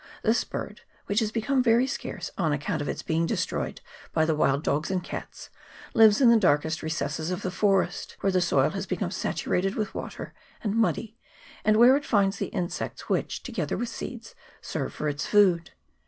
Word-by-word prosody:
This 225 +2 +3
bird, - - -6 0.2
which 205 +2 +1
has 215 -2 -1
become 240 +4 +1
very 235 0 +4
scarce, 210 -8 -5
on 165 -5 0
account 145 +2 -1
of 145 - -3
its - - -4
being 165 +1 0
destroyed - - -2 0.3
by 160 -1 +2
the 160 - +2
wild 145 -1 +1
dogs 150 +1 0
and 185 -2 -1
cats, - - -8 0.4
lives 220 -2 +6
in 250 -4 +7
the 230 - +6
darkest 160 -3 +2
recesses 155 0 -2
of 185 +2 -3
the 185 - -2
forest, 195 -1 0
where 195 - +2
the 185 -1 +2
soil 140 -6 +2
has 195 0 -4
become 185 -1 -2
saturated 190 0 -1
with 215 -2 -2
water, - - -6 0.3
and 210 -1 -1
muddy, 225 0 0 0.4
and 215 0 +4
where 245 +3 +7
it 290 - -1
finds 200 -5 +2
the - - -2
insects 180 -5 -4
which, - - -1
together - - -3
with 240 - -2
seeds, 230 -2 -7 0.3
serve 145 -5 -4
for 150 - -4
its 145 0 -2
food. 185 -5 +4
195 Hz, 190 wpm, -27 LUFS, 160-220 Hz, 0.4 s, in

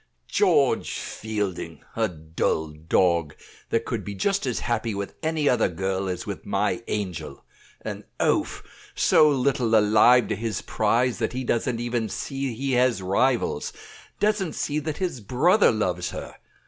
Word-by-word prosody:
"George - - +2
Fielding! 100 -7 -4
a 115 -1 +2
dull 80 -2 -2
dog, 80 0 +1 0.3
that - - 0
could - - -3
be 100 - -6
just 195 - 0
as 125 - -1
happy 115 -2 -1
with 100 0 -4
any 160 -2 0
other 125 - +3
girl 95 +2 -2
as 90 0 -4
with - - -6
my - - 0
angel. 85 -9 -4 0.4
An - - -6
oaf, - - 0 0.3
so 155 - +5
little 130 -4 +2
alive 110 +3 +5
to - - 0
his 110 +1 -3
prize 115 +3 +1
that - - -1
he 130 +1 -3
doesn't 120 0 0
even 120 -2 -1
see 135 +2 -3
he 135 +3 -2
has 125 -5 +2
rivals; 120 +7 +1 0.5
doesn't 205 -6 +1
see 150 +1 -1
that 155 0 -4
his 175 -10 -3
brother 160 - +4
loves 90 -5 -1
her. - - -7
115 Hz, 150 wpm, -25 LUFS, 95-130 Hz, 0.5 s, so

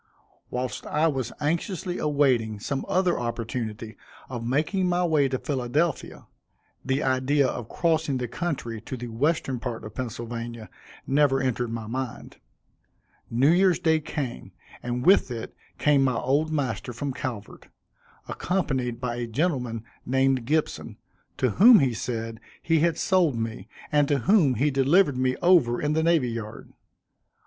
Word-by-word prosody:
Whilst 125 0 -4
I 150 +2 +1
was 130 -6 -2
anxiously 175 +4 -2
awaiting 130 -8 +1
some 135 +6 -3
other 180 -1 +2
opportunity 115 -2 -4 0.3
of 120 -3 -5
making 155 - 0
my 175 0 +1
way 155 -4 +3
to 130 - -1
Philadelphia, 140 +4 -2 0.6
(the 135 +2 0
idea 135 +2 +2
of 120 -3 -5
crossing 160 -5 0
the 125 -1 -3
country 120 -6 -4
to 130 - -6
the 120 0 -6
western 135 +1 0
part 120 -2 -5
of 105 - -8
Pennsylvania, 115 -2 -6 0.3
never 140 -1 +3
entered 125 -2 -1
my 115 -1 -4
mind,) 125 +2 -5 0.9
New 130 +6 +3
Year's 180 0 +4
day 160 -3 +2
came, 145 - -5 0.3
and 125 +1 -3
with 190 -5 +5
it 115 -2 -6 0.2
came 145 -2 +3
my 130 -2 +1
old 145 +6 +1
master 130 -5 -2
from 140 +3 -4
Calvert, 115 -6 -6 0.6
accompanied 130 -10 -2
by 120 -1 -3
a 120 -1 -3
gentleman 125 -4 -1 0.2
named 130 -1 +1
Gibson, 155 +4 -1 0.4
to 130 -3 +1
whom, 235 +1 +10
he 135 -7 +2
said, 115 -1 -4 0.2
he 165 -1 +2
had 165 0 +2
sold 180 -8 +2
me, 115 -3 -4 0.2
and 145 -2 +3
to 145 - +2
whom 140 - +3
he 145 +6 +1
delivered 140 +2 +3
me 130 0 +1
over 165 -10 +4
in 150 0 0
the 160 - +2
Navy 160 -6 +2
Yard. 115 -2 -7
130 Hz, 150 wpm, -26 LUFS, 120-155 Hz, 0.9 s, whom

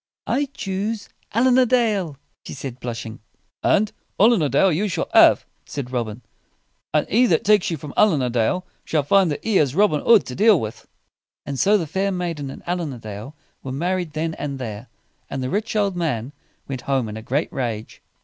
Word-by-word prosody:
"I 285 - +1
choose 205 +3 -3 0.2
Allin 250 +3 +4
a 255 - +5
Dale," 210 - +1 0.3
she - - -8
said, 130 -2 -7
blushing. 115 -2 -6 0.4
"And 210 +1 +2 0.3
Allin 220 -2 +5
a 150 - +1
Dale 145 +8 +4
you 185 +7 0
shall 190 - -2
have," - - +6 0.2
said 130 -3 -5
Robin; 115 -2 -3 0.7
"and - - +1
he 245 +4 +4
that 165 -7 +2
takes 210 -2 +4
you 165 - -2
from 145 0 -9
Allin 175 -11 +4
a 125 - -1
Dale 125 +11 0 0.2
shall 155 -3 0
find 190 +5 +4
that 145 - -4
he 220 -3 +2
has 140 -2 +2
Robin 190 -6 +3
Hood 230 -4 +5
to 125 - -6
deal 205 - +5
with." 110 -2 -6 0.6
And 140 -2 -4
so 205 +2 +4
the 175 - -2
fair 190 +6 -1
maiden 170 -6 -3
and - - -10
Allin 175 -5 -2
a - - -8
Dale 110 +5 -8 0.3
were 130 - -6
married 175 +3 -2
then 160 +1 -2
and 140 -2 -3
there, 115 -2 -6 0.4
and 135 - -3
the 130 - -3
rich 220 +2 -2
old 200 -3 +1
man 145 -7 -2 0.3
went 130 -3 -4
home 135 -4 +1
in 105 - -6
a 110 - -6
great 135 +7 -2
rage. 115 -4 -4
155 Hz, 200 wpm, -22 LUFS, 130-200 Hz, 0.7 s, have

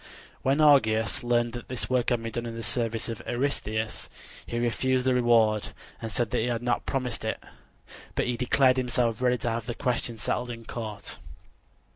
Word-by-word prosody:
When 135 +3 +2
Augeas 110 -8 +4
learned 120 -1 +1
that 120 -1 -7
this 125 -1 -3
work 125 -2 +1
had 120 -2 0
been 115 - -4
done 120 0 -3
in 115 - -5
the 115 - -5
service 115 +1 -2
of 115 -2 -5
Eurystheus, 110 -4 -1 0.4
he 120 - -3
refused 125 +2 +1
the 130 - +4
reward 115 -4 +3 0.3
and 115 - -4
said 115 +1 -1
that - - +1
he 115 - 0
had 120 -1 -1
not 120 - 0
promised 130 -3 -1
it; - - -2 0.8
but - - +1
he 125 - 0
declared 130 +1 +3
himself 120 -2 +1
ready 125 0 +3
to 120 - -2
have 115 0 -3
the 120 - -3
question 120 -3 -1
settled 125 +3 -2
in 115 -1 -7
court. 110 -4 -6
120 Hz, 190 wpm, -27 LUFS, 115-125 Hz, 0.8 s, Augeas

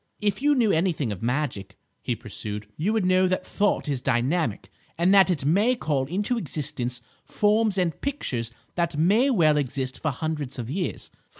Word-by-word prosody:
"If 210 +1 -1
you 290 +1 +4
knew 230 -5 +3
anything 160 - 0
of 100 - -6
magic," 120 -5 -2 0.2
he - - -2
pursued, 105 0 -7
"you 180 +8 0
would 220 -4 +1
know 185 0 +4
that 185 0 -1
thought 205 -5 0
is 140 -4 -1
dynamic, 130 - 0 0.3
and 175 +3 +3
that 195 -1 +6
it 150 -7 -1
may 205 - +3
call 145 - -1
into 205 - -1
existence 130 - -3 0.2
forms 210 -1 +1
and 175 -4 -1
pictures 125 - -2 0.2
that 170 -3 -1
may 210 - +4
well 160 - +4
exist 130 -2 -2
for 160 - 0
hundreds 145 -1 -3
of 120 0 -5
years. 180 +2 -3
160 Hz, 175 wpm, -25 LUFS, 130-200 Hz, 0.3 s, that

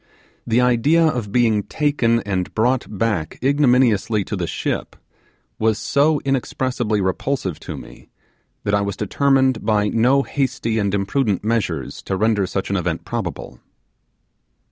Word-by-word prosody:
The 120 +1 +3
idea 125 +7 +3
of 120 -10 -1
being 115 -3 +3
taken 120 -3 +1
and 95 -4 -2
brought 125 +3 +1
back 105 -6 -2
ignominiously 125 -6 +3
to 105 - -4
the 90 -3 -3
ship - - -3 0.6
was 110 -1 +2
so 145 +5 +2
inexpressibly 125 -4 -1
repulsive 95 - -2
to - - -7
me, - - -13 0.5
that 100 - -1
I 100 - +3
was 100 -1 -3
determined 130 +3 +2
by 105 -1 +2
no 125 +5 +3
hasty 125 -6 -1
and 100 -2 0
imprudent 100 +1 0
measures 100 - -2
to 95 - -3
render 105 -2 +1
such 95 0 -3
an 100 - +1
event 90 - -2
probable. - - -5
115 Hz, 140 wpm, -20 LUFS, 100-130 Hz, 0.6 s, The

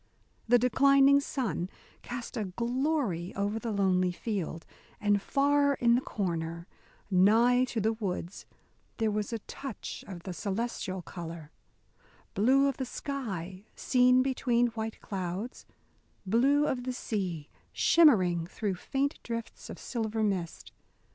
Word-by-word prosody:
The 245 +1 +6
declining 275 +3 +5
sun 245 -10 -2 0.3
cast 245 0 -6
a 220 -3 -1
glory 235 - -1
over 205 +2 -1
the 230 0 -3
lonely 185 -3 +2
field, 175 -4 -4 0.3
and 205 -1 +2
far 285 +3 +2
in 235 -2 +3
the 245 - +3
corner, 170 -6 -3 0.5
nigh 230 +7 +5
to 240 -2 -3
the 220 +2 +1
woods, 195 -4 -5 0.5
there 220 -2 +1
was 210 +1 -2
a 230 - -1
touch 275 -6 -7
of 175 -4 -8
the 185 - -5
celestial 195 -2 -3
colour: 165 -2 -8 0.8
blue 265 +7 +4
of 275 - -1
the 265 - -2
sky 200 - -5
seen 250 0 +4
between 245 -2 +1
white 225 -1 -5
clouds: 190 +4 -5 0.6
blue 270 +9 +3
of 250 -4 -1
the 255 0 -3
sea 185 -11 -3 0.2
shimmering 185 - +4
through 200 +1 -2
faint 270 +9 -2
drifts 230 -1 -6
of - - -7
silver 220 -2 -2
mist. 190 -5 -2
220 Hz, 130 wpm, -30 LUFS, 185-250 Hz, 0.8 s, The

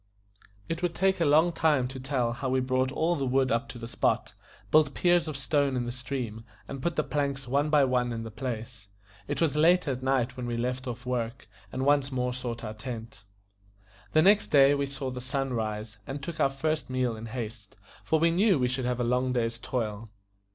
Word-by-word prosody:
It 165 +1 -3
would 175 -2 -1
take 190 0 +2
a - - +4
long 155 +4 +5
time 150 -6 +2
to 130 0 -7
tell 130 -3 -1
how 130 +2 -3
we 130 0 +2
brought 130 0 +1
all 165 +5 +1
the 140 - -2
wood 130 0 +2
up 115 +4 0
to - - -7
the 115 -1 -7
spot, - - 0 0.4
built 155 -2 +4
piers 175 -2 +3
of 155 -3 -4
stone 140 0 +1
in 125 - 0
the 120 - -3
stream, 120 -3 -5 0.2
and 135 -1 -6
put 170 +4 -1
the - - +1
planks 140 -3 -2
one 140 +4 +1
by 150 -2 +5
one 125 -2 +1
in 115 -1 -4
the 115 - -7
place; 115 -3 -6 0.4
it 145 - -2
was 160 -4 +2
late 170 +3 +4
at 130 -2 -2
night 130 -1 +1
when 125 -1 -5
we 120 -1 -2
left 125 +2 -2
off 125 +1 -6
work, 125 -1 -3 0.2
and 130 +1 -2
once 140 -1 +3
more 125 -1 -1
sought 120 -2 -5
our 110 -1 -4
tent. 115 -1 -8 0.9
The 155 - +5
next 205 +3 +5
day 140 -1 +6
we 140 -1 0
saw 135 -1 -4
the 125 0 -6
sun 135 +1 -2
rise, 110 -1 -3
and 140 +1 -5
took 160 +1 -6
our 140 - +4
first 140 0 -2
meal 130 -2 0
in 110 +1 -7
haste, 110 -3 -7 0.3
for 160 +10 +2
we 165 +1 +3
knew 190 +1 +4
we 125 -2 +1
should 125 0 -2
have 125 0 -1
a - - +1
long 125 +1 +1
day's 115 -1 -1
toil. 115 -3 -3
130 Hz, 220 wpm, -28 LUFS, 120-145 Hz, 0.9 s, day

